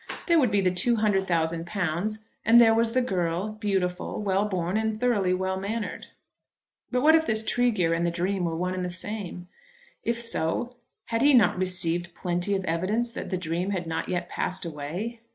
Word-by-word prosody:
There 340 -2 +4
would 255 -5 +3
be 205 -1 +2
the 185 -1 +2
two 235 +6 +3
hundred 205 -3 +1
thousand 165 0 0
pounds; 200 +4 -2 0.2
and 230 +2 +7
there 225 -1 +7
was 230 0 +2
the 255 0 +2
girl, 180 -2 -1
beautiful, 195 -4 -2
well 200 -1 +1
born, 185 -2 -2
and 220 0 -1
thoroughly 215 -7 +2
well 190 +1 -1
mannered. 210 +3 -4 0.8
But 250 +1 0
what 315 +2 +7
if 320 0 +4
this 220 0 +1
Tregear 215 -10 +2
and 165 +1 0
the 170 - +2
dream 180 +2 -1
were 165 -1 -2
one 180 +2 -1
and 185 0 -3
the 180 - -2
same? 180 -1 -6 0.6
If 235 0 -1
so, 235 +2 -2 0.3
had 230 0 0
he 285 0 +6
not 235 -4 +5
received 175 -2 0
plenty 180 +2 -1
of 190 -1 -2
evidence 195 +9 0
that - - -6
the 185 - -1
dream 175 +2 -2
had 185 -3 -2
not 160 0 -3
yet 175 -1 -2
passed 185 +1 -2
away? 170 +10 -5
190 Hz, 195 wpm, -26 LUFS, 175-225 Hz, 0.8 s, and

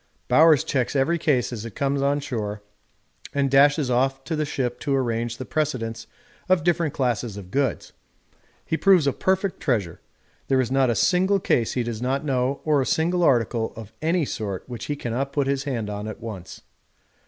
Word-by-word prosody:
Bowers 155 +1 +5
checks 130 +1 -1
every 155 +6 +2
case 130 -6 +1
as 110 -3 -5
it 115 - -8
comes 140 -2 0
on 140 +1 +2
shore 105 -6 -4 0.7
and 140 -1 +1
dashes 140 0 +4
off 135 +2 +1
to 160 - -3
the 155 0 0
ship 125 -4 -3
to 140 - 0
arrange 120 -2 -1
the 130 - -6
precedence 120 -8 -2 0.4
of 185 -4 +3
different 170 -3 +1
classes 120 -5 -1
of 95 -2 -10
goods. 140 +1 -1 0.7
He 160 - -1
proves 185 -5 +5
a 140 - +2
perfect 190 +4 0
treasure; 110 - -1 0.5
there 135 -1 +2
is 130 -1 0
not 135 -1 +3
a 120 - +1
single 190 - +3
case 120 -10 +1
he 125 - 0
does 115 -1 -5
not 135 +4 -1
know 130 0 0
or 150 -3 +3
a - - -1
single 175 +3 +1
article 120 -6 +2
of 110 -2 -10
any 165 0 +1
sort 100 -7 -5
which 125 -1 -6
he 145 - -2
cannot 135 +1 -3
put 140 -2 +1
his 135 0 -1
hand 120 -7 -2
on 105 0 -5
at 110 - -7
once. 105 -6 -8
135 Hz, 190 wpm, -24 LUFS, 115-150 Hz, 0.7 s, Bowers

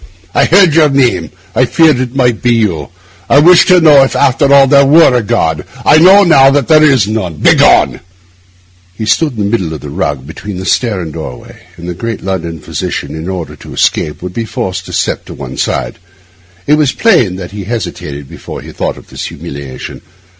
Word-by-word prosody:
'I - - +2
heard 185 -2 +4
your 155 -2 +4
name; 125 - 0 0.2
I 130 - +2
feared 155 +1 +2
it 130 0 -4
might 125 -4 0
be 125 - +1
you; 90 -10 -2 0.4
I - - +4
wished 170 +4 +5
to 185 -1 +5
know 150 -4 +6
if, 135 - 0
after 135 +2 +1
all, 140 -1 +6
there 140 +1 +4
were 145 0 +5
a 125 - +1
God; 80 -6 -1 0.2
I 155 - +5
know 190 +4 +6
now 135 -7 +5
that 140 -1 0
there 155 -1 +5
is 135 -9 +3
none. 100 -7 -3
Begone!' - - +3 1.0
He 110 - -5
still 110 +10 +1
stood 125 - -12
in 105 - -2
the 100 - -2
middle 90 -9 -2
of - - -9
the 75 - -9
rug, 70 -2 -3
between 100 +5 -8
the 95 - -6
stair 110 -5 -1
and 80 -3 -7
doorway; 60 -2 -9 0.2
and 85 - -9
the 90 - -4
great 115 +4 -6
London 85 -4 -4
physician, - - -5
in 80 +3 -6
order 85 -6 -6
to - - -12
escape, 75 +3 -1
would 90 0 -6
be 115 - -3
forced 95 -6 -5
to - - -9
step - - -2
to - - -10
one - - -8
side. - - -3 0.7
It 150 +1 +2
was 145 -4 +1
plain 150 - +2
that 90 -1 -8
he 100 -1 -7
hesitated 75 - -6
before - - -10
the - - -11
thought - - -4
of - - -16
this - - -6
humiliation. 70 -2 -9
115 Hz, 210 wpm, -11 LUFS, 90-140 Hz, 1.0 s, know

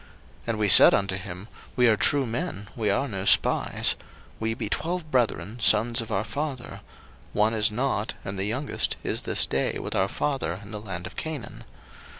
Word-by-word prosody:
01:042:031 - - -23 0.4
And 115 -2 -1
we 105 -1 +1
said 100 - +9
unto 100 -1 0
him, 90 +1 -8 0.3
We 125 -1 +4
are 110 - +5
true 140 +6 +3
men; 115 - -4
we 110 -3 -1
are 120 +8 +1
no 95 -6 -4
spies: - - +3
01:042:032 - - -20 0.3
We 110 0 -1
be 105 - -4
twelve 160 - -3
brethren, 115 -3 0
sons 115 +2 +3
of 115 - -8
our 100 0 0
father; 130 +3 -5 0.5
one 105 +2 +2
is 105 -1 +2
not, 115 -1 -2
and 95 - -4
the 95 - +1
youngest 130 +8 -1
is - - -1
this - - 0
day 70 - -1
with - - -5
our - - +2
father 130 -11 -2
in 100 - -12
the 105 -1 -6
land 90 -4 -6
of 90 - -9
Canaan. 155 -5 -6
110 Hz, 195 wpm, -25 LUFS, 100-125 Hz, 0.5 s, said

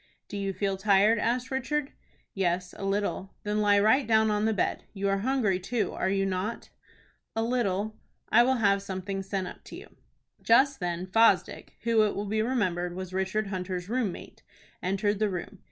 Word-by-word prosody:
"Do - - -8
you 195 -1 -2
feel 195 +1 -2
tired?" 205 +3 +4
asked 245 +4 -1
Richard. 270 +2 -1 0.4
"Yes, 180 -1 -1
a - - -8
little." 195 -1 -2
"Then 210 0 0
lie 205 -1 +4
right 220 +7 +3
down 220 -1 +4
on 210 0 +1
the 220 - +2
bed. 205 - -1
You 200 0 -1
are 195 0 +1
hungry 220 -5 +1
too, 210 +1 -1
are 190 - -1
you 195 0 +1
not?" 195 +4 -3 0.7
"A 225 - 0
little." 215 -3 -1 0.3
"I 230 - +6
will 260 +2 +3
have 200 -4 +2
something 195 0 -4
sent 195 -1 -3
up - - -10
to - - -9
you." - - -12 0.5
Just 270 +4 +4
then 175 0 -2
Fosdick, 225 +5 +2
who, 230 -1 +3
it 210 -1 +1
will 205 - -3
be 215 +2 0
remembered, 185 -8 -1
was 185 0 -6
Richard 190 +2 -1
Hunter's 185 -1 -4
room 235 -4 0
mate, - - -11 0.4
entered 195 +2 0
the 215 -1 +2
room. 185 +1 -6
205 Hz, 185 wpm, -28 LUFS, 190-225 Hz, 0.7 s, I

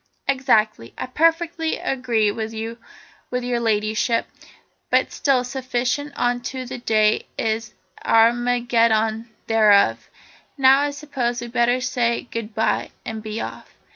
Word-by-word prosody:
"Exactly. 220 - +1
I - - -3
perfectly 325 +3 +1
agree 235 -5 0
with 220 +1 -5
your 225 +1 -5 0.5
Ladyship, 230 -2 0 0.6
but - - +2
still 265 -3 +1
sufficient 255 +2 -2
unto 245 +1 -2
the 250 0 -7
day 215 -2 +2
is 220 0 -1 0.3
the - - -8
Armageddon 230 -1 +2 0.2
thereof. 205 - +3 0.5
Now 270 0 +6
I 290 +1 +1
suppose 275 -5 -3
we'd 240 0 -7
better 245 +1 +2
say 240 -2 -1
goodbye 225 -1 -1 0.2
and 220 -1 -5
be 215 +1 -5
off." - - -8
240 Hz, 115 wpm, -22 LUFS, 220-255 Hz, 0.6 s, Now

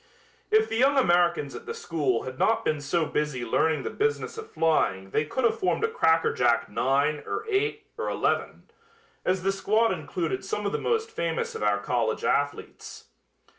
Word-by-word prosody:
If 440 0 +4
the - - -2
young 275 +3 +4
Americans 175 - +2
at - - -9
the - - -4
school 140 -8 -1
had 130 0 -7
not 225 - +2
been 155 -2 0
so 160 +3 0
busy 150 -5 -2
learning 150 +5 +1
the - - -4
business 445 +1 -1
of 440 0 -8
flying 95 -12 +1
they 150 - +1
could 260 - -3
have 235 - +2
formed 375 - 0
a - - +4
cracker 165 - +2
jack 120 -2 +2
nine 145 +3 +1
or - - -4
eight 435 +1 -1
or - - -1
eleven, - - -1 0.6
as 185 0 0
the 195 - +2
squad 215 +3 +2
included 170 +3 -3
some 205 +1 -3
of 200 - 0
the - - -1
most 450 -1 -1
famous 165 -1 -2
of - - -6
our 105 -1 +2
college 110 +1 -1
athletes. 145 0 -2
165 Hz, 185 wpm, -26 LUFS, 140-230 Hz, 0.6 s, If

